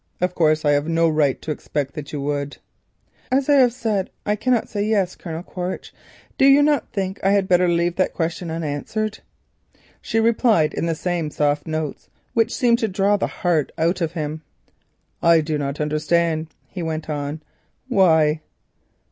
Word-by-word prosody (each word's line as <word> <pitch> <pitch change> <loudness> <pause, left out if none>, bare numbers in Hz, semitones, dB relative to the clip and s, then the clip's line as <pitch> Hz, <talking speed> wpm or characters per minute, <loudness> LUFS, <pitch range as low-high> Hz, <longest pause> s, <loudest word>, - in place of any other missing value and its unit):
Of 180 0 0
course, 155 -2 +2
I 145 - +4
have 145 +1 +1
no 165 0 +2
right 150 -4 +2
to 155 - -3
expect 145 -2 -3
that 150 -3 -7
you 150 - -4
would." 145 0 -3 0.7
"As 265 +1 +2
I 290 - +6
have 250 -2 +5
said 220 -6 -1 0.2
that - - -1
I - - +2
cannot 245 +2 +1
say 205 - -3
'yes,' 205 -4 +1
Colonel 165 -1 -6
Quaritch, 180 0 -5 0.5
do - - +6
you 275 +1 +7
not 295 -2 +1
think 195 -2 -2
that - - -2
I - - +4
had 200 -2 +2
better 180 0 +4
leave 170 0 +1
that 185 - 0
question 165 +1 -2
unanswered?" 165 +7 -3 0.8
she 225 - 0
replied 225 -8 +3
in 165 - -2
the 165 - 0
same 170 -2 -2
soft 150 0 0
notes 155 -2 -4 0.2
which 225 -1 +2
seemed 235 -2 +2
to 225 - +1
draw 195 +1 +2
the 200 - 0
heart 165 -5 0
out 170 +3 +1
of 165 -1 -1
him. 155 -1 -4 0.8
"I 170 -1 +5
do 155 -1 -1
not 140 0 -3
understand," 155 +2 0 0.2
he 185 - -7
went 160 -1 -3
on. 150 0 -4 0.4
"Why?" 160 - +3
170 Hz, 180 wpm, -22 LUFS, 155-200 Hz, 0.8 s, you